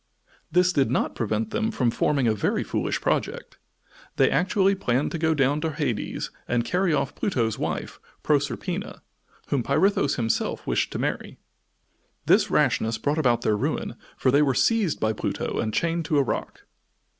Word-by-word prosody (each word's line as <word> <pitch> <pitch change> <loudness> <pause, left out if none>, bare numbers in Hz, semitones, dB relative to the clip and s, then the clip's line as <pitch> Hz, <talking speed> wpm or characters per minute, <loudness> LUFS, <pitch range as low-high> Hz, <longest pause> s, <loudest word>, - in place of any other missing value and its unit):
This 180 +1 +3
did 135 -6 +2
not 130 - 0
prevent 110 -1 -2
them 225 0 0
from 125 - 0
forming 135 +1 +1
a 110 - +3
very 105 - 0
foolish - - -2
project. - - -2 0.6
They - - +3
actually 190 +1 +2
planned 135 -8 0
to 165 - -3
go 160 0 +2
down 145 +1 +1
to 160 -1 -2
Hades 140 -8 -3 0.2
and 120 -1 0
carry 180 +3 +1
off 140 -2 0
Pluto's 115 - -1
wife, - - -4 0.2
Proserpina, 145 -4 -1 0.5
whom 140 - +1
Pirithous 155 - +2
himself 115 -2 -1
wished - - 0
to - - -3
marry. - - -3 0.9
This - - +4
rashness 110 0 +1
brought 145 +7 -1
about 120 -5 +2
their 110 - +2
ruin, 105 - -2 0.2
for 130 - +2
they 140 +2 +4
were 135 -3 +2
seized 220 -9 +2
by 110 0 +1
Pluto - - -3
and 110 - -1
chained 165 +6 -1
to 150 - +1
a 140 - +4
rock. - - -4
140 Hz, 170 wpm, -25 LUFS, 120-170 Hz, 0.9 s, This